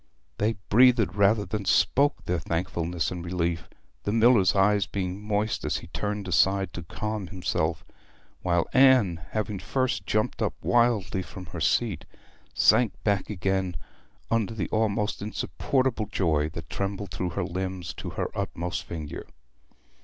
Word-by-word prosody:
They 110 +2 +2 0.2
breathed 120 -1 +5
rather 100 +1 +3
than 100 +2 -3
spoke 140 +8 +2
their 90 -1 0
thankfulness 85 -1 -2
and 90 -1 -5
relief, 85 -2 -2 0.3
the 100 - -2
miller's 115 -4 +5
eyes 100 +1 +3
being 95 0 -3
moist 105 +1 -1
as - - 0
he - - -9
turned 105 +3 -3
aside 95 +1 +2
to 85 - -5
calm 105 +4 -4
himself; 85 -3 -2 0.6
while 85 -2 +1
Anne, 130 -11 +5
having 105 -2 -2
first 130 +6 -1
jumped 110 0 0
up - - 0
wildly 115 -5 +2
from 95 0 -9
her 85 - -5
seat, 105 +5 +1 0.5
sank 120 -4 +4
back 100 -3 0
again 95 -2 -1 0.5
under 115 -1 +1
the 105 - -3
almost 110 -2 0
insupportable 115 +2 -1
joy 80 -7 +1
that 80 +1 -8
trembled 100 0 -3
through 90 - -2
her - - +1
limbs 95 0 -4
to - - -6
her - - -4
utmost 90 +2 -3
finger. 80 -3 -7
100 Hz, 145 wpm, -27 LUFS, 90-110 Hz, 0.6 s, breathed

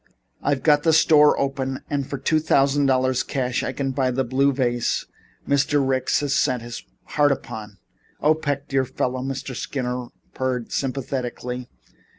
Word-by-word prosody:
I've 140 -2 0
got 150 -2 +5
the 160 +1 +3
store 150 -1 +5
open 135 -1 -2
and 140 -2 -2
for 140 - -3
two 155 +4 +1
thousand 140 -2 +3
dollars 130 -1 +2
cash 125 -2 -1
I - - -2
can 135 0 -2
buy 130 0 +1
the 130 +1 0
blue 135 +3 +2
vase 120 -3 0 0.4
Mr. 140 0 +2
Ricks 130 +1 +1
has 145 -2 0
set 125 -3 +1
his 120 0 -7 0.2
heart 145 -1 +2
upon." 105 -6 -5 0.4
"Oh, 150 +1 +4
Peck, 145 -2 -3
dear 135 -1 +1
fellow," 130 0 -2
Mr. 135 0 -4
Skinner 125 -1 -3 0.3
purred 130 -3 -2
sympathetically. 125 -2 -3
135 Hz, 160 wpm, -23 LUFS, 125-140 Hz, 0.4 s, got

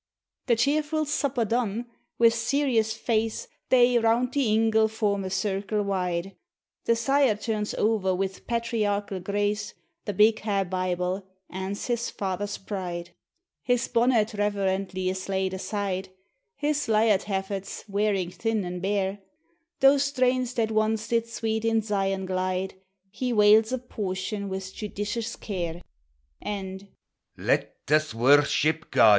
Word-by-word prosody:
The 235 - +4
cheerfu' 300 +5 +1
supper 275 -4 0
done, 230 0 -1 0.3
wi' 230 -1 +7
serious 230 -1 +1
face, 225 - -1 0.2
They, 245 -1 +5
round 235 +2 +2
the 275 -5 +2
ingle, 220 0 +4
form 210 -2 -1
a 190 - -3
circle 200 +2 -1
wide; 185 -1 -2 0.5
The 230 - +3
sire 270 0 +3
turns 210 0 -2
o'er, 205 -4 +1
wi' 195 +1 +1 0.2
patriarchal 210 -4 -1
grace, 205 +3 -1 0.3
The 205 - -2
big 215 +3 +4
ha' 200 -2 0
Bible, 185 +1 -2 0.2
ance 190 +2 -4
his 240 -1 -1
father's 200 +1 -3
pride; 180 -4 -5 0.5
His 245 0 +1
bonnet 235 -3 +3
reverently 195 -2 -1
is 185 +1 -3
laid 190 -1 0
aside, 195 -1 -3 0.5
His 295 0 -1
lyart 215 -2 +3
haffets 195 -1 -4
|| - - -34
wearing 200 -3 0
thin 220 -1 -1
an' 180 0 -4
bare: 195 +1 -1 0.6
Those 275 +1 +6
strains 255 -2 +1
that 225 -2 +1
once 215 +1 0
did 230 -1 +1
sweet 220 -1 -2
in 225 0 +2
Zion 195 -2 -1
glide, 185 0 -1 0.4
He 250 +3 -2
wales 215 +1 +6
a 260 - +1
portion 200 -4 -4
with 190 0 -5
judicious 210 +2 -4
care; 175 -5 -4 0.6
And 195 -1 -5 0.3
" - - -49
Let - - 0
us 155 -4 +2
worship 145 +5 +3
God! 110 - +6
210 Hz, 135 wpm, -26 LUFS, 190-230 Hz, 0.6 s, wi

